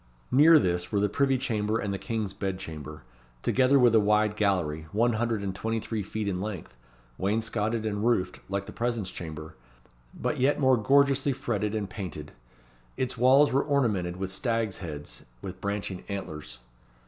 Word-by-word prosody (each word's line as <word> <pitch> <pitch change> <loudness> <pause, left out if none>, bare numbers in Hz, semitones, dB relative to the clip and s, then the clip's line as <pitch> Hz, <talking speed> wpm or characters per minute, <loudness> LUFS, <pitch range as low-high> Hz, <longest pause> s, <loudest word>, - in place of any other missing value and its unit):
Near 155 +5 +7
this 90 -7 0
were 100 - +1
the 105 0 +2
privy 135 -1 +2
chamber 110 -3 -1
and 100 -3 -2
the 100 - -3
King's 110 -5 -3
bed 95 -2 -3
chamber, 75 -4 -8 0.4
together 130 +2 +4
with 125 -3 +5
a 110 - +7
wide 105 0 +2
gallery, 85 -7 0
one 120 +3 +2
hundred 110 -2 -1
and 95 -1 -2
twenty 110 +4 -2
three 110 0 -3
feet 105 +2 -4
in 90 -2 -1
length, 95 - -6 0.4
wainscotted 110 +2 -1
and 105 -1 -2
roofed 105 -6 +1
like 100 0 -2
the 105 - -9
presence 115 -5 -2
chamber, 80 -2 -7 0.7
but - - -1
yet 135 +4 +2
more 130 -2 +5
gorgeously 140 +4 +3
fretted 110 -5 -2
and 105 -2 -2
painted. 90 -6 -7 0.7
Its 130 -1 -1
walls 130 +4 +5
were 135 - +4
ornamented 105 -12 0
with 95 0 -3
stags' 115 0 -1
heads 75 -5 -7 0.2
with 95 0 -7
branching 100 -2 -3
antlers. 75 -10 -6
105 Hz, 170 wpm, -28 LUFS, 95-120 Hz, 0.7 s, Near